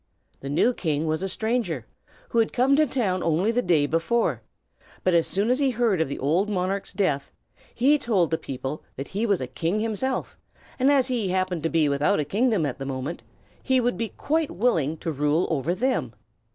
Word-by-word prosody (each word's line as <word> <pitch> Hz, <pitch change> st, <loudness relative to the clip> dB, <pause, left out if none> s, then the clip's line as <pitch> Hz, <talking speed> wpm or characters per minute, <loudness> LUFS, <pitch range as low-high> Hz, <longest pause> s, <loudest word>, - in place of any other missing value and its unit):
The 135 Hz, -, -7 dB
new 170 Hz, -, +3 dB
king 155 Hz, -7 st, -1 dB
was 155 Hz, +1 st, -1 dB
a 195 Hz, -, -2 dB
stranger, 225 Hz, +5 st, -1 dB, 0.4 s
who 235 Hz, -, +1 dB
had 225 Hz, -, +1 dB
come 265 Hz, +2 st, +3 dB
to 305 Hz, +1 st, +3 dB
the -, -, -15 dB
town 195 Hz, -8 st, 0 dB
only 170 Hz, +7 st, +1 dB
the 245 Hz, +1 st, +1 dB
day 165 Hz, -8 st, +3 dB
before; 165 Hz, +10 st, 0 dB, 0.6 s
but 185 Hz, -, +2 dB
as 170 Hz, -1 st, +3 dB
soon 205 Hz, +5 st, +1 dB
as 255 Hz, -, +2 dB
he 275 Hz, -2 st, +3 dB
heard 230 Hz, -7 st, +1 dB
of 160 Hz, -, 0 dB
the 140 Hz, -, -4 dB
old 170 Hz, +9 st, +1 dB
monarch's 195 Hz, 0 st, -2 dB
death, 165 Hz, -8 st, -1 dB, 0.4 s
he 285 Hz, +5 st, +4 dB
told 190 Hz, -, +1 dB
the 160 Hz, -, +2 dB
people 135 Hz, +3 st, -5 dB
that 135 Hz, -, -6 dB
he 215 Hz, +4 st, -1 dB
was 200 Hz, -4 st, +1 dB
a -, -, -1 dB
king 165 Hz, +10 st, -2 dB
himself, 225 Hz, +4 st, -2 dB, 0.4 s
and 260 Hz, +2 st, +4 dB
as 270 Hz, -2 st, +3 dB
he 235 Hz, -6 st, 0 dB
happened 185 Hz, -2 st, -1 dB
to 165 Hz, -, 0 dB
be 160 Hz, -2 st, +2 dB
without 140 Hz, +2 st, +2 dB
a 150 Hz, -, 0 dB
kingdom 210 Hz, -, +1 dB
at 140 Hz, -2 st, -4 dB
that 135 Hz, -, -4 dB
moment, 135 Hz, +4 st, -4 dB, 0.4 s
he 260 Hz, -1 st, +2 dB
would 245 Hz, 0 st, +1 dB
be 230 Hz, -1 st, -3 dB
quite 315 Hz, +6 st, -1 dB
willing 165 Hz, -, 0 dB
to 165 Hz, -, -3 dB
rule 150 Hz, +3 st, +1 dB
over 160 Hz, +3 st, 0 dB
them. 255 Hz, +7 st, -1 dB
185 Hz, 210 wpm, -25 LUFS, 155-235 Hz, 0.6 s, he